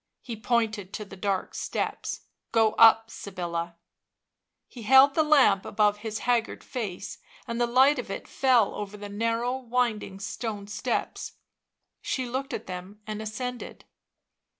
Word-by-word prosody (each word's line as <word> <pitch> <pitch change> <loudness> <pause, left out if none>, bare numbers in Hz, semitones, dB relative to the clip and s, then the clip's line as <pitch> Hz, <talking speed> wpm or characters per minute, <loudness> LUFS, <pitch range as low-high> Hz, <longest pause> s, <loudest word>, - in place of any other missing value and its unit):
He 235 - -5
pointed 220 -4 -1
to 210 - -5
the 195 - -11
dark 195 0 -2
steps. - - -3 0.3
11 225 -1 +5
Go - - -12
up, 225 0 +6
Sybilla." 170 -3 -5 0.9
He 245 - -11
held 265 +5 +7
the 315 - +3
lamp 275 -11 +5
above 210 -1 +2
his 220 0 -5
haggard 235 -2 0
face, 200 -6 -5 0.3
and 235 +1 -2
the 240 - +3
light 260 +4 +5
of 245 - -5
it 195 - -5
fell 250 -6 +3
over 210 0 -6
the 205 0 -8
narrow 230 +4 0
winding 235 -6 -1
stone 205 +1 -4
steps; 210 +4 -3 0.7
she 260 - -2
looked 265 +3 -3
at - - -4
them 185 +3 -8
and 215 0 -5
ascended. 245 +3 -6
220 Hz, 150 wpm, -27 LUFS, 205-245 Hz, 0.9 s, held